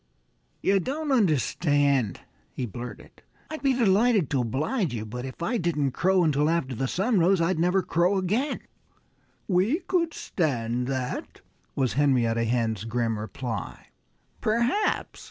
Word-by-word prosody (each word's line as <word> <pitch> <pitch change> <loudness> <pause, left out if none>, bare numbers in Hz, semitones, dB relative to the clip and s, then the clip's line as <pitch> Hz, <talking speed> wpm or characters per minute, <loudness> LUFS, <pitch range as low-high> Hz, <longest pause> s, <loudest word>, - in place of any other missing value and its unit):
"You 195 0 +3
don't 290 - -3
understand," 145 - +2 0.3
he 130 - -2
blurted. 120 +2 -9 0.3
"I'd 315 - -5
be 275 -2 +3
delighted 220 - +3
to 135 -3 +2
oblige 150 - -1
you, 110 -1 -4
but 125 +4 -6
if 135 +5 -7
I 235 +8 0
didn't 150 -5 0
crow 185 +5 +2
until 150 -1 +2
after 160 -6 0
the 130 +3 -2
sun 195 - +1
rose 180 +2 +4
I'd 165 0 +1
never 180 +3 +2
crow 175 +4 +2
again." 215 +10 -1 0.9
"We 205 - +2
could 340 -2 0
stand 125 - -1
that," 130 -2 -4 0.3
was 130 -3 0
Henrietta 120 -5 +2
Hen's 115 -3 0
grim 115 -1 -1
reply. 110 -1 -6 0.5
"Perhaps!" 235 - 0
160 Hz, 135 wpm, -26 LUFS, 125-200 Hz, 0.9 s, rose